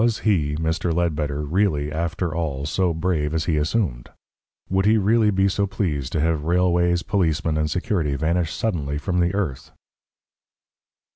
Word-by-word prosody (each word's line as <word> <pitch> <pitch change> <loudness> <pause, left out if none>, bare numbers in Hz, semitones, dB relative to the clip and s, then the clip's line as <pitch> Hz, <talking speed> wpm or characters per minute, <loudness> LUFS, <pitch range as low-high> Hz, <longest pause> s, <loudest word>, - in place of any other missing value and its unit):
Was 115 -1 +1
he 80 -9 +1
Mr. 80 +2 -1
Ledbetter 75 -4 -1
really, 75 -2 0
after 85 +1 -2
all, 75 -5 -2
so 90 +4 +1
brave 80 -2 -1
as 80 -1 0
he 85 - +1
assumed? 75 - -1 0.6
Would 95 +1 +1
he 110 +1 +5
really 110 +2 +3
be 95 -1 +2
so 100 +1 0
pleased 75 - -2
to 80 - 0
have 80 -1 +1
railways, 85 0 +2
policemen, 85 -5 0
and 75 0 0
security 80 -3 -1
vanish 80 +3 0
suddenly 75 -10 -2
from 90 +3 -1
the 85 +2 +1
earth? 90 -11 -3
85 Hz, 155 wpm, -23 LUFS, 75-95 Hz, 0.6 s, he